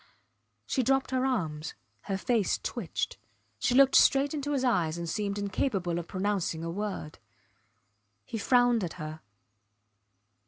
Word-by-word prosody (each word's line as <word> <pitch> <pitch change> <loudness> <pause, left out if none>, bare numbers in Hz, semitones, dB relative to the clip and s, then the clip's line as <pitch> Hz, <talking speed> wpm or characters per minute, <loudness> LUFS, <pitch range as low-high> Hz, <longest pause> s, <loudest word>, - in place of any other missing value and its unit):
She 265 - 0
dropped 270 +2 +1
her 260 0 +1
arms; 160 -11 -2 0.3
her 195 - -1
face 220 0 +1
twitched. - - -4 0.4
She 245 - +1
looked 270 0 +6
straight 275 +1 +5
into 290 -1 -2
his 270 -2 0
eyes 175 -10 +1
and 170 0 -4
seemed 200 +3 -2
incapable 195 -3 -1
of 170 - -7
pronouncing 190 -4 -1
a 165 - -3
word. 200 -5 -5 1.1
He 225 - -5
frowned 245 -1 +3
at 170 - -3
her. 155 -1 -7
205 Hz, 140 wpm, -29 LUFS, 170-255 Hz, 1.1 s, looked